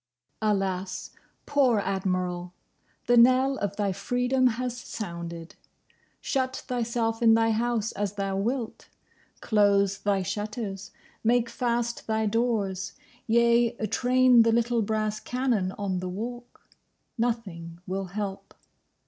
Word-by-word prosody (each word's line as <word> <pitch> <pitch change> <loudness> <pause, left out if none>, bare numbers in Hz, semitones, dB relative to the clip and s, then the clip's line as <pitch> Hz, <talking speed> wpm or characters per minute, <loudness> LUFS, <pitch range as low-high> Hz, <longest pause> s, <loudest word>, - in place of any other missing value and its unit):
Alas, 195 -3 -1 0.3
poor 270 -5 +3
Admiral! 185 -2 -2 0.5
The 240 0 +4
knell 255 +3 +5
of 200 0 -2
thy 205 -1 0
freedom 250 +6 +1
has 245 +1 -2
sounded. 170 -8 -7 0.7
Shut 260 -2 -2
thyself 230 -2 -1
in 225 -1 +6
thy 225 0 +3
house 225 -1 0
as 205 -1 -3
thou 195 -1 -2
wilt: 230 +4 -3 0.5
close 200 -2 +3
thy 200 -2 +1
shutters; 205 0 -4 0.3
make 235 +1 +2
fast 235 0 -2
thy 220 0 +1
doors; 205 -4 0 0.3
yea, 235 +1 +4 0.2
train 255 -1 +5
the 230 0 +4
little 235 0 +2
brass 215 0 -1
cannon 245 -8 0
on 195 -3 -2
the 185 0 -4
Walk: 240 +6 -7 0.5
nothing 190 -8 -3
will 190 +1 -3
help. 195 +1 -5
220 Hz, 115 wpm, -27 LUFS, 195-240 Hz, 0.7 s, in